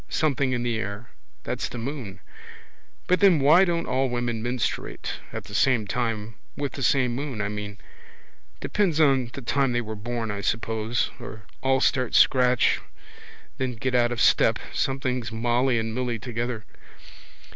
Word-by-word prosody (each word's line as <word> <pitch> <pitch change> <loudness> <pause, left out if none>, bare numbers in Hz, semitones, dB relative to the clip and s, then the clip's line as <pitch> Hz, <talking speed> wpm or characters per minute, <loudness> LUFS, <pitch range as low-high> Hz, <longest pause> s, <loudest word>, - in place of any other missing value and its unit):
Something 140 -4 +1
in 120 -1 -1
the 120 -2 -1
air. 105 +3 -5 0.3
That's - - -3
the - - -7
moon. 115 -6 -6 0.8
But 180 - +2
then 190 -6 +6
why 155 +7 +6
don't 170 -2 -1
all 130 +1 0
women 120 -2 -2
menstruate 120 +1 -3
at - - -5
the - - -12
same 120 0 +3
time 115 0 -2 0.2
with 140 -1 -2
the 140 - -7
same 125 -1 +2
moon, 135 -2 -4
I 100 0 -1
mean? 105 0 -6 0.8
Depends 180 -7 +1
on 135 -5 +4
the 140 - -7
time 135 +1 +1
they 120 - +1
were 110 -1 -6
born 115 +1 -3
I 100 -1 -4
suppose. 115 +2 -1
Or 110 -3 -9 0.2
all 135 0 +2
start 130 -3 +1
scratch 125 -1 +4 0.8
then 130 -2 -1
get 130 +3 -2
out 120 -1 +3
of 120 - -3
step. - - +4 0.2
Sometimes 130 -4 -1
Molly 120 +2 +1
and 110 0 -2
Milly 125 -1 -1
together. 115 0 -4
120 Hz, 160 wpm, -25 LUFS, 115-135 Hz, 0.8 s, then